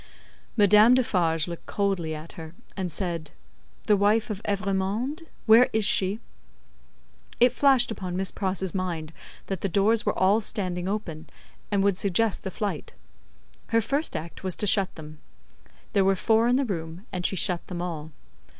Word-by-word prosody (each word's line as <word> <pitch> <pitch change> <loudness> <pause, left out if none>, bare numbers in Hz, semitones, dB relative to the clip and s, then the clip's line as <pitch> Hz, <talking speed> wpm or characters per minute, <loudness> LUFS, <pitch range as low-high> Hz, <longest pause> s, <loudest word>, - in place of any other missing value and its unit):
Madame 210 +3 +6
Defarge 170 -10 +1
looked 170 -1 -8
coldly 190 -6 -1
at 155 +2 -9
her, 160 0 -10 0.2
and 185 -3 -3
said, 165 -2 -3 0.5
"The 210 - +3
wife 210 +3 +2
of 205 -1 -5
Evrémonde; 205 - -2 0.2
where 230 +3 +6
is 220 -1 +2
she?" 195 +2 +3 1.2
It 245 0 +5
flashed 260 -2 +3
upon 180 -4 -5
Miss 190 0 0
Pross's 190 -1 -2
mind 170 -4 -4 0.3
that 195 -2 -4
the 200 - -1
doors 210 +4 +2
were - - -1
all 195 +4 +3
standing 185 -4 -3
open, 170 -6 -5 0.4
and 200 -2 +1
would 200 -2 +2
suggest 200 +2 0
the - - -5
flight. 190 -4 -4 0.7
Her 230 - +2
first 275 - -1
act 165 +4 -9
was 185 -2 0
to - - 0
shut 200 -2 +2
them. 155 -1 -11 0.7
There 200 -2 +3
were 195 0 +3
four 225 +4 +2
in 245 - +3
the 275 +1 +1
room, 170 -2 -5
and 180 -2 -4
she 190 - 0
shut 180 -1 -1
them 180 -2 -6
all. 160 -3 -5
195 Hz, 165 wpm, -26 LUFS, 175-215 Hz, 1.2 s, Madame